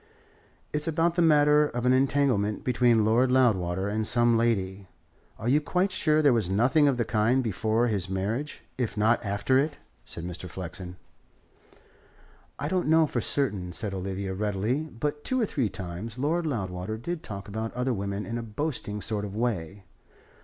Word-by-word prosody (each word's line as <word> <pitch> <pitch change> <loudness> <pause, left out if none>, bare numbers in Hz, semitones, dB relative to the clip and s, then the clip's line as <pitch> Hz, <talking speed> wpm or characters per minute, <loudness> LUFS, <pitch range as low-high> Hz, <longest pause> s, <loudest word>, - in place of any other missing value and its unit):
"It's 150 +1 0
about 165 +1 +2
the 175 - +1
matter 150 -2 +5
of 120 -3 -4
an 125 - +5
entanglement 130 -6 +1
between 120 -3 +3
Lord 120 +4 +3
Loudwater 95 -8 +2
and 110 +1 -1
some 120 -1 +3
lady. 100 -4 0 0.5
Are 110 - -5
you 145 +5 +4
quite 180 +5 0
sure 155 -4 +2
there 140 -3 +5
was 110 -6 +1
nothing 130 +10 +3
of 135 -3 +2
the 120 - 0
kind 115 +5 +2
before 110 +2 +1
his 100 -6 -1
marriage, 105 +10 -3 0.2
if 120 -3 -2
not 110 +3 +3
after 105 +6 +1
it?" 145 +1 -1 0.3
said 85 - -6
Mr. 90 +1 -5
Flexen. 90 +1 -6 1.6
"I 145 - -3
don't 180 +1 0
know 160 +1 +5
for 125 -5 -2
certain," 100 -10 -1
said 100 +4 -3
Olivia 95 0 -3
readily. 105 +8 -1
"But 150 +2 -4
two 260 - 0
or 230 - +2
three 130 - -1
times 95 +6 -6
Lord 160 +5 0
Loudwater 95 -5 -3
did 170 +8 -4
talk 100 -1 -7
about 110 +2 -4
other 125 +1 0
women 100 0 -3
in 115 +1 -3
a - - -3
boasting 115 -2 -4
sort 105 -2 -2
of 100 -1 -6
way. 100 -5 -2
115 Hz, 175 wpm, -27 LUFS, 100-140 Hz, 1.6 s, matter